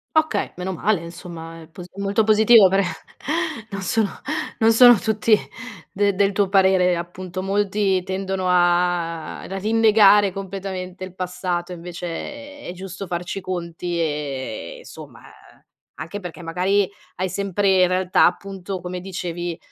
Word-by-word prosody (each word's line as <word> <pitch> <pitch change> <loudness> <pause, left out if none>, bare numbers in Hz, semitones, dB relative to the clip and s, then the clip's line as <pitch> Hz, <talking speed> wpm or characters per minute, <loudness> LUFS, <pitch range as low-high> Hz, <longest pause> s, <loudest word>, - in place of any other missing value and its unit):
Okay! 315 0 +1
Meno 185 +1 -3
male 200 +2 +1
insomma, 165 -1 -9
è 160 - -13
pos 175 +2 -10
è - - -23
molto 200 +2 +1
positivo 215 -1 +7
però, 195 +1 +2 0.9
non 195 -1 -5
sono 200 +2 +1 0.5
non 225 0 +5
sono 245 +1 +9
tutti 220 0 +2 0.5
de 200 0 +1
del 200 0 +2
tuo 200 -1 +1
parere 190 -2 +4
appunto 180 +1 -6
molti 195 -1 +1
tendono 190 0 -2
a 175 -2 +1
a 195 - -6
rinnegare 210 -2 +5
completamente 190 -1 -6
il 185 0 -13
passato 180 -1 -3
invece 175 0 -7 0.5
è - - -10
è 175 - -5
giusto 190 +1 -7
farci 175 +2 -4
i - - -4
conti, 175 -1 -4
e 140 - -4
somma, - - -12
eh, - - -21 0.3
anche 185 +6 -6
perché 180 -2 -8
magari 185 +4 +1 0.3
hai 185 +1 -2
sempre 195 0 +1
in - - +5
realtà 185 0 +3
appunto 190 0 -3
come 180 0 -5
dicevi, 175 -2 -5
185 Hz, 145 wpm, -22 LUFS, 175-200 Hz, 0.9 s, sono